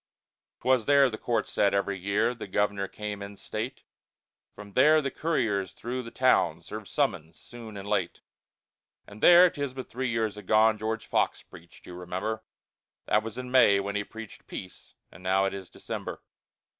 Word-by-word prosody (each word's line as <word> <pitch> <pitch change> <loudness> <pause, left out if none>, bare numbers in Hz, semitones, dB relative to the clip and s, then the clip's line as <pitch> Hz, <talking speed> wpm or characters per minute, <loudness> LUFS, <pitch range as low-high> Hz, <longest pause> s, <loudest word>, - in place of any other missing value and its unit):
'Twas 125 -2 +2
there 140 -2 +5
the 110 - -5
court 120 -1 -1
sat 100 -1 +2
every 100 0 0
year, 100 +5 0
The 115 - -8
governor 100 0 0
came 105 -1 -6
in 100 0 -7
state, 110 +7 -5 0.7
From 100 -1 -11
there 155 +7 +6
the 140 -3 -2
couriers 110 - -1
through 125 +2 -4
the 115 - -8
town 115 -10 +2
Served 110 -1 -8
summons 90 - -1
soon 115 -3 -10
and 100 0 -7
late. - - -1 0.8
And 100 +1 -13
there, 175 +1 +9
'tis 140 -3 -4
but 130 - -7
three 130 +1 -2
years 110 -2 -1
agone, 110 +1 +3
George 110 +1 -3
Fox - - 0
preached, 85 -1 -16
you 90 - -10
remember; 90 +5 -4 0.6
That 105 - +3
was 115 +2 -7
in 125 0 -6
May 100 -6 +6
when 100 +1 -3
he 105 - 0
preached 110 0 -11
peace, 95 - -9 0.2
And - - -14
now 95 +1 +2
it 95 - -1
is 95 -2 -7
December. - - -7
110 Hz, 175 wpm, -28 LUFS, 100-125 Hz, 0.8 s, there